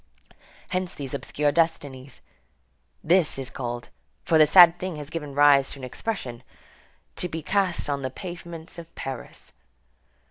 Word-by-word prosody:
Hence 185 -1 -2
these 135 -3 -7
obscure 145 0 0
destinies. 145 -5 -1 0.8
This 170 -3 +3
is 135 -1 -5
called, 120 -2 -5 0.4
for 160 - +4
this 155 -1 +6
sad 175 -2 +8
thing 185 -2 -4
has 150 0 -8
given 150 -4 -5
rise 145 -2 +5
to 140 - -11
an - - -11
expression, 125 - -5 0.8
"to 180 - -1
be 160 -1 -5
cast 190 -1 +1
on 140 -1 -2
the 130 - -2
pavements 170 +2 -9
of 165 0 -13
Paris." 135 -2 -7
150 Hz, 145 wpm, -25 LUFS, 135-170 Hz, 0.8 s, sad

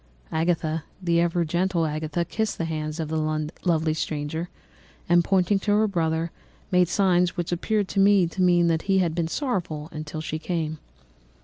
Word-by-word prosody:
Agatha, 160 -1 0 0.2
the 170 -2 +2
ever 170 0 +1
gentle 175 +1 +1
Agatha, 155 +2 -2
kissed 220 +2 -2
the 165 - -1
hands 155 0 -3
of 160 - -2
the 155 -1 -1 0.2
lovely 160 -3 +2
stranger, 155 +2 -3 0.6
and 175 0 +5
pointing 195 +2 +2
to 205 +1 0
her 215 +1 +3
brother, 165 -3 -1 0.4
made 180 -1 +4
signs 180 -1 +2
which 175 0 -2
appeared 205 +3 0
to 195 - -2
me 195 -2 +5
to 170 +3 -4
mean 175 -1 +4
that 165 -1 +2
he 195 - +4
had 175 -4 +2
been 170 -1 -1
sorrowful 165 - -3
until 155 0 -6
she 155 0 -4
came. 160 -2 -3
170 Hz, 175 wpm, -25 LUFS, 160-180 Hz, 0.6 s, and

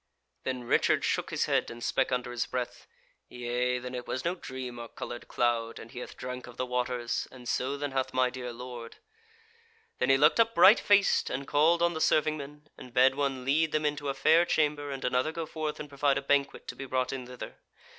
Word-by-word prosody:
Then 130 -1 -2
Richard 120 - +2
shook - - 0
his - - 0
head, - - +1
and 120 0 -8
spake 135 - +1
under 125 -1 -1
his 120 0 -2
breath: 125 -1 -4 0.4
"Yea, 125 +1 -1
then 125 0 -6
it 125 -1 -5
was 130 - -3
no 170 - +1
dream 130 -8 -7
or 120 - -6
coloured 120 +1 -7
cloud, 115 -1 0
and 115 - -10
he 125 - -7
hath - - -8
drank 125 0 -6
of 120 - -12
the 130 - -1
waters, 125 -1 -2
and 125 -2 -12
so 135 +4 -1
then 145 0 -3
hath 135 -1 -1
my 130 -1 +2
dear 125 -1 -6
lord." 120 -1 -8 1.0
Then - - +1
he 135 - +6
looked 150 +9 +4
up 230 0 +3
bright 195 +6 +8
faced, 200 -1 +3
and 135 +2 -4
called 165 +4 +3
on 170 0 +3
the 160 - -4
serving 155 0 +3
men, 150 +1 -10
and 125 -1 -12
bade 130 +1 +6
one 135 -2 -2
lead 155 +4 +2
them 155 0 +1
into 145 -1 -1
a 135 - -2
fair 155 +5 +5
chamber, 150 -3 0
and 135 -1 -4
another 125 +4 +1
go 165 0 -4
forth 155 -1 -4
and 150 - -6
provide 140 0 +1
a 140 - -3
banquet 140 0 0
to - - -5
be 135 - -6
brought 130 0 -1
in 130 -2 -5
thither. 125 0 -9
130 Hz, 225 wpm, -29 LUFS, 125-150 Hz, 1.0 s, bright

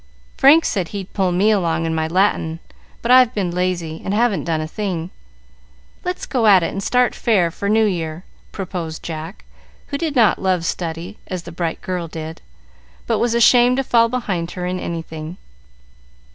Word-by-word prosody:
"Frank 300 +5 +6
said 185 -5 -1
he'd 195 0 -7
pull 190 -3 +1
me 195 +5 +3
along 165 -5 +1
in 165 - -1
my 160 0 0
Latin, 165 -2 +1 0.4
but 235 - +1
I've 255 -1 +6
been 190 -4 -1
lazy 175 -3 -2
and 195 - -2
haven't 225 -3 +1
done 165 -2 0
a 155 - -3
thing. 180 -2 -4 0.9
Let's 360 +1 -3
go 240 -5 +1
at 190 -4 +6
it - - -1
and 195 - -4
start 250 +4 +2
fair 190 -8 +1
for 200 +4 -3
New 220 +1 +4
Year," 165 -4 -3 0.3
proposed 175 -4 -5
Jack, 160 +3 -7 0.4
who 280 - -3
did 315 -4 -2
not 230 -4 +4
love 185 -3 +1
study 170 +4 -4
as 185 -3 -5
the 170 - -9
bright 165 -1 -3
girl 180 -2 -3
did, 160 0 -7 0.6
but 225 -2 0
was 235 -1 +1
ashamed 245 +1 +5
to 270 - +1
fall 230 -2 +3
behind 195 -9 -2
her 180 - -3
in 180 0 -2
anything. 165 0 -6
185 Hz, 180 wpm, -20 LUFS, 165-220 Hz, 0.9 s, Frank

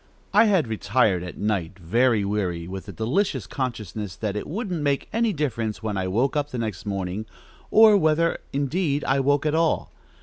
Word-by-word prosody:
I 215 +2 +6
had 190 - +3
retired 110 -3 +1
at 90 -1 -7
night, 100 -4 -2
very 110 +4 +2
weary, 90 -5 -2
with 95 +1 -7
the - - -6
delicious 130 - -1
consciousness 110 -5 -4
that 105 -2 -3
it 105 - -4
wouldn't 185 -3 -3
make 140 -1 0
any 230 0 +2
difference 115 - -2
when 105 -2 -2
I 95 -1 -1
woke 120 +10 +1
up 145 -1 0
the 125 - -5
next 110 -2 -4
morning, 100 +2 -3 0.4
or 220 -1 +7
whether, 165 -2 +2
indeed, 145 +1 0
I 135 +1 +1
woke 145 +2 +2
at 150 - +1
all. 165 0 +1
120 Hz, 180 wpm, -24 LUFS, 100-150 Hz, 0.4 s, or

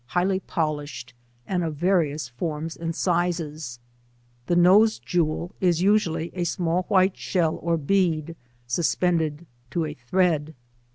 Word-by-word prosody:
75 - - -17
highly 185 +2 +2
polished, 150 -8 -3 0.3
and 180 -2 -1
of 160 -2 -3
various 155 -5 +1
forms 155 +5 -4
and 165 0 -4
sizes; 165 -8 -1 0.7
the 175 - +2
nose 200 +6 +6
jewel 170 0 -1
is 175 -2 +2
usnatly 175 -5 +2
a 180 - -4
sraail 175 +1 0
white 185 0 +4
slieil 165 -4 0
or 170 -1 +1
bead 165 -1 0 0.3
suspended 160 +3 0 0.2
to 165 +3 -1
a 150 - -5
thread. 155 +2 0
170 Hz, 130 wpm, -25 LUFS, 155-180 Hz, 0.7 s, nose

